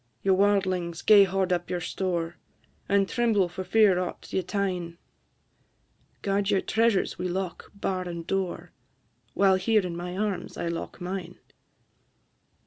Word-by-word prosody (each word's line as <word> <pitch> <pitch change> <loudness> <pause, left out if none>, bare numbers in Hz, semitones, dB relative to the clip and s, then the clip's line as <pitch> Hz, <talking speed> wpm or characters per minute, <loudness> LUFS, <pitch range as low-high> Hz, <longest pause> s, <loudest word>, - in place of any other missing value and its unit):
Ye 195 - +3
warldlings! 185 -3 +1
gae 205 -2 +8
hoard 190 -1 0
up 175 0 -2
your 180 - -1
store, 175 -1 -2 0.5
And 200 -1 +3
tremble 225 -6 +2
for 175 +2 -6
fear 195 -1 +4
aught 180 -1 -5
ye 190 - +2
tyne; 180 -3 -3 1.3
Guard 200 0 0
your 200 -2 +3
treasures 225 -5 +1
wi' 180 - -1
lock, 180 0 -4
bar, 185 -2 -2
and 170 -1 -6
door, 190 -1 -3 0.6
While 195 -1 +4
here 210 +1 +2
in 175 -2 -4
my 180 +1 -5
arms 200 -3 -3
I 170 - -2
lock 170 - -5
mine!" 185 +1 -5
190 Hz, 140 wpm, -27 LUFS, 175-200 Hz, 1.3 s, gae